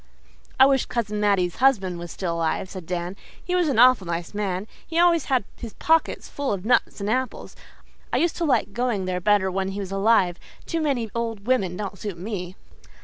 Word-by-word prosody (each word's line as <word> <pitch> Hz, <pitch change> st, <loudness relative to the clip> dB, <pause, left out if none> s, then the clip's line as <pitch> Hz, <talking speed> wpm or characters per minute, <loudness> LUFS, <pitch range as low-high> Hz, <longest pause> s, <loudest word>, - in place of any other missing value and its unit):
"I 265 Hz, -, +9 dB
wish 270 Hz, -2 st, +2 dB
Cousin 210 Hz, -3 st, -2 dB
Mattie's 195 Hz, -4 st, +1 dB
husband 195 Hz, -10 st, +2 dB
was 175 Hz, 0 st, -7 dB
still 175 Hz, -3 st, -3 dB
alive," 165 Hz, +3 st, -1 dB
said 185 Hz, -4 st, -8 dB
Dan. 175 Hz, +1 st, -3 dB, 0.3 s
"He 360 Hz, -, -2 dB
was 360 Hz, -2 st, +2 dB
an 265 Hz, -, 0 dB
awful 245 Hz, -6 st, +6 dB
nice 170 Hz, 0 st, -3 dB
old -, -, -21 dB
man. 200 Hz, -2 st, -2 dB, 0.2 s
He 330 Hz, -, -4 dB
always 340 Hz, -1 st, +4 dB
had 260 Hz, -4 st, +1 dB
his 230 Hz, -3 st, -8 dB
pockets 325 Hz, 0 st, +1 dB
full 285 Hz, -1 st, -3 dB
of 195 Hz, -1 st, -3 dB
nuts 235 Hz, -3 st, +1 dB
and 200 Hz, -, -2 dB
apples. 255 Hz, +4 st, -2 dB, 0.6 s
I -, -, +1 dB
used 340 Hz, 0 st, +1 dB
to 345 Hz, -, -1 dB
like 265 Hz, -9 st, +1 dB
going 240 Hz, -6 st, -1 dB
there 180 Hz, -1 st, -2 dB
better 195 Hz, 0 st, +3 dB
when 190 Hz, +1 st, -1 dB
he 195 Hz, +1 st, -4 dB
was 195 Hz, -2 st, -5 dB
alive. 195 Hz, -3 st, +2 dB, 0.3 s
Too 330 Hz, -, -2 dB
many 255 Hz, -8 st, -1 dB
old 230 Hz, -3 st, -3 dB
women 195 Hz, -8 st, +1 dB
don't 195 Hz, -2 st, -5 dB
suit 205 Hz, -5 st, -5 dB
me." 185 Hz, -1 st, -5 dB
205 Hz, 205 wpm, -24 LUFS, 185-255 Hz, 0.6 s, I